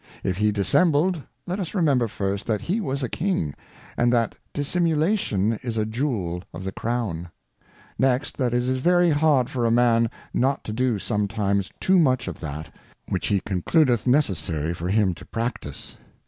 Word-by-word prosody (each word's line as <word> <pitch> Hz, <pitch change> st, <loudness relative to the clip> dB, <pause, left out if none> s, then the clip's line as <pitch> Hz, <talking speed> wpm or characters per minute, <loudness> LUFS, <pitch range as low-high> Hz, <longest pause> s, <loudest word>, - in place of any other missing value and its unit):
If 90 Hz, -1 st, -1 dB
he 105 Hz, +1 st, +2 dB
dissembled; 155 Hz, -, +2 dB, 0.2 s
let 180 Hz, +3 st, -3 dB
us 185 Hz, +1 st, -4 dB
remember, 140 Hz, -10 st, +3 dB
first, 100 Hz, -1 st, -3 dB
that 110 Hz, -3 st, 0 dB
he 205 Hz, +6 st, -1 dB
was_a 135 Hz, -, -2 dB
King, 180 Hz, -, 0 dB
.^ -, -, -8 dB, 0.4 s
and 120 Hz, 0 st, +2 dB
that 115 Hz, -2 st, +2 dB, 0.2 s
Dissimulation 155 Hz, -, +1 dB
is 115 Hz, -3 st, -4 dB
a 110 Hz, -, +1 dB
Jewel 110 Hz, -, -2 dB
of -, -, -6 dB
the 95 Hz, -, -3 dB
Crown; 105 Hz, -8 st, -3 dB, 0.7 s
next, 130 Hz, +2 st, +1 dB
that 125 Hz, -3 st, +1 dB
it 120 Hz, -, +2 dB
i -, -, -3 dB
is -, -, 0 dB
very 175 Hz, +3 st, +4 dB
hard 145 Hz, -4 st, +3 dB
for 130 Hz, -3 st, -2 dB
a 115 Hz, -, +3 dB
Man 115 Hz, -1 st, +4 dB, 0.2 s
not 135 Hz, +3 st, +1 dB
to 105 Hz, -, -5 dB
do 125 Hz, -1 st, +1 dB
sometimes 100 Hz, -2 st, -1 dB
too 190 Hz, 0 st, +4 dB
much 130 Hz, -6 st, +2 dB
of -, -, -5 dB
that, 75 Hz, -2 st, -6 dB, 0.4 s
which -, -, -1 dB
he 100 Hz, -2 st, +1 dB
concludeth 120 Hz, -, +1 dB
necessary 85 Hz, -, +1 dB
for 85 Hz, +1 st, -4 dB
him 100 Hz, -2 st, +2 dB
to -, -, -12 dB
practice. 115 Hz, -, -5 dB
120 Hz, 175 wpm, -24 LUFS, 100-145 Hz, 0.7 s, very